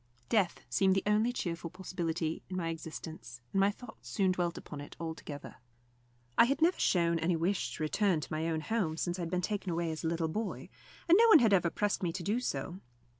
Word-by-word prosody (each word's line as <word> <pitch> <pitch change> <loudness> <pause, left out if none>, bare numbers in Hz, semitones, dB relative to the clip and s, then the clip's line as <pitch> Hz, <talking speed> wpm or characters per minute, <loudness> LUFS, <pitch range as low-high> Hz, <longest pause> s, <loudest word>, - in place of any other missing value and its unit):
Death 200 -6 +2
seemed 190 -1 +3
the 195 - +1
only 210 +3 +3
cheerful 170 -7 -3
possibility 170 -3 -3
in 185 - -4
my 165 -2 -1
existence, 160 -6 -7
and 195 - +2
my 195 +1 +5
thoughts 225 +3 -10
soon 190 -3 +2
dwelt 175 -2 -1
upon 145 -2 -8
it 145 - -10
altogether. 160 -3 -7 0.8
I - - +9
had 275 +3 0
never 335 +3 +3
shown 170 -2 +2
any 170 +2 +1
wish 180 +4 -1
to - - -4
return 185 +2 +2
to 155 - -6
my 160 +1 -1
own 160 -1 -1
home 175 -5 -1
since 175 +2 -2
I - - -2
had 170 - -3
been 180 +1 0
taken 205 +1 -2
away 165 0 -1
as 160 +1 -5
a - - 0
little 165 0 0
boy, 215 +7 -4 0.4
and 345 +4 +7
no 465 - +7
one 440 - +9
had 225 -7 +4
ever 175 -3 +4
pressed 205 +3 -1
me 175 -3 0
to 180 0 -4
do 215 +7 +1
so. 185 -7 -3
175 Hz, 225 wpm, -32 LUFS, 165-205 Hz, 0.8 s, I